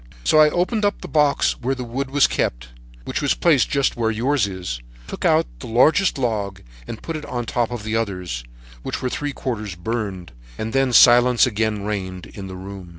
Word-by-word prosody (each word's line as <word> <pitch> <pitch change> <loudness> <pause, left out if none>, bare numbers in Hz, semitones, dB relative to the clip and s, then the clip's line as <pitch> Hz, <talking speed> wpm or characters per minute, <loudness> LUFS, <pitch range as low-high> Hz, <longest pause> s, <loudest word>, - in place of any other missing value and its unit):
"So 155 - +4
I 155 0 +7
opened 185 +7 0
the 205 - +5 0.2
box 150 -2 +2
where 130 +2 0
the 130 - -5
wood 130 +3 -4
was 145 +1 +4
kept, - - -2 0.4
which - - -3
was - - +1
placed - - +3
just 140 -1 +1
where 115 -2 0
yours 120 +2 +1
is, 90 -11 -5 0.2
took - - -6
out - - +4
the - - -8
largest 155 - +3
log 105 -7 -2 0.2
and 110 - -7
put 165 - -4
it 155 - -6
on 120 -1 -3
top 120 -1 -1
of 120 -3 -6
the 110 +1 -2
others, 90 - -3 0.4
which - - -5
were 125 - 0
three 145 -1 -3
parts 110 -9 -4
burned, 95 -2 -4 0.3
and 110 +1 -4
then 135 -1 +2
silence 120 0 +6
again 110 -3 -1
reigned 95 -3 -4
in 100 -2 -9
the 95 - -8
room. 95 -1 -9
115 Hz, 200 wpm, -21 LUFS, 100-135 Hz, 0.4 s, I